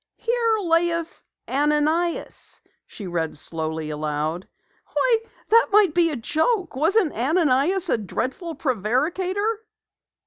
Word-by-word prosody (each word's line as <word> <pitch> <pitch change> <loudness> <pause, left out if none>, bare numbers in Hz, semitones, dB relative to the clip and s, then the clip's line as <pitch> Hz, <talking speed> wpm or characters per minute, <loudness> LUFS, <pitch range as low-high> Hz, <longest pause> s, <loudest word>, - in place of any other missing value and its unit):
"'Here 465 -2 +1
laeth 335 0 0 0.3
Ananias'" 300 +5 0 0.3
she 205 - -9
read 165 -3 -2
slowly 160 0 -4
aloud. 150 +3 -3 0.5
"Why, 485 -2 +4 0.3
that 460 +2 +5
might 400 -5 +5
be 340 -1 +3
a 305 - -3
joke! 320 - 0
Wasn't 330 +4 +2
Ananias 315 - +2
a 235 - +1
dreadful 260 - -4
prevaricator?" 330 - 0
315 Hz, 105 wpm, -23 LUFS, 225-370 Hz, 0.5 s, that